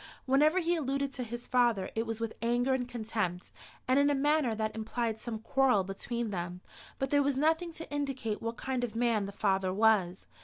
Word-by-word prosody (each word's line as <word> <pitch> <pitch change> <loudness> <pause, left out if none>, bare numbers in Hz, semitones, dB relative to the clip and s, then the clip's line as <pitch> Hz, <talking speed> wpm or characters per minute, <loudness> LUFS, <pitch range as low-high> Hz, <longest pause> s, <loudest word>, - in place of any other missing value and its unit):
Whenever 295 +6 +4
he 350 -1 +2
alluded 275 -2 -1
to 250 - -3
his 240 +1 -7
father, 235 -6 +2
it 225 +1 -2
was 225 0 -3
with 230 -1 -3
anger 240 +3 +2
and 250 -1 -1
contempt, 215 -7 -3 0.4
and 260 +2 +4
in 285 +1 +4
a 290 - +2
manner 290 -4 +2
that 220 0 -2
implied 220 0 -2
some 235 -2 -4
quarrel 230 -2 +2
between 220 +4 -4
them; 175 -1 -4 0.4
but 270 -1 -2
there 285 -1 +4
was 280 -1 +1
nothing 320 +4 +2
to 325 0 -8
indicate 270 -7 -2
what 230 0 -4
kind 260 -2 -2
of 230 -2 -3
man 230 -4 +1
the - - -6
father 195 -2 +1
was. 195 -3 +2
240 Hz, 200 wpm, -31 LUFS, 215-270 Hz, 0.4 s, Whenever